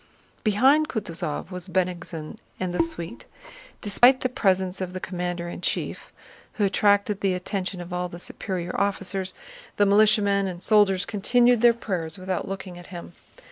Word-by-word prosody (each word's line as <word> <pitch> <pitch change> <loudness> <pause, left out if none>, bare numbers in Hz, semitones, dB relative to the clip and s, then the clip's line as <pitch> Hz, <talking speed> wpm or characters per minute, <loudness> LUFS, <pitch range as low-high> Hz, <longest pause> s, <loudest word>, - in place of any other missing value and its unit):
Behind 265 +9 +4
Kutúzov 170 - -4
was 180 0 -7
Bennigsen 175 -4 -3 0.2
and 185 -1 -2
the - - +2
suite. 170 - -5 0.5
Despite 245 +6 +5
the 255 - 0
presence 190 -5 0
of 180 -1 -4
the 185 - -4
commander 175 -1 -4
in 175 - -7
chief, - - -3 0.4
who 215 - -1
attracted 205 0 +2
the 190 -2 +1
attention 185 0 -3
of 175 0 -7
all 180 0 -2
the 175 - -8
superior 180 0 -5
officers, 195 -1 -2 0.4
the 205 - +5
militiamen 205 -1 +4
and 180 -1 -6
soldiers 205 -3 +4
continued 240 +3 +3
their 240 0 +7
prayers 175 -8 -4
without 185 -1 -3
looking 190 -2 -6
at 175 - -12
him. 175 -1 -9
190 Hz, 155 wpm, -25 LUFS, 180-205 Hz, 0.5 s, their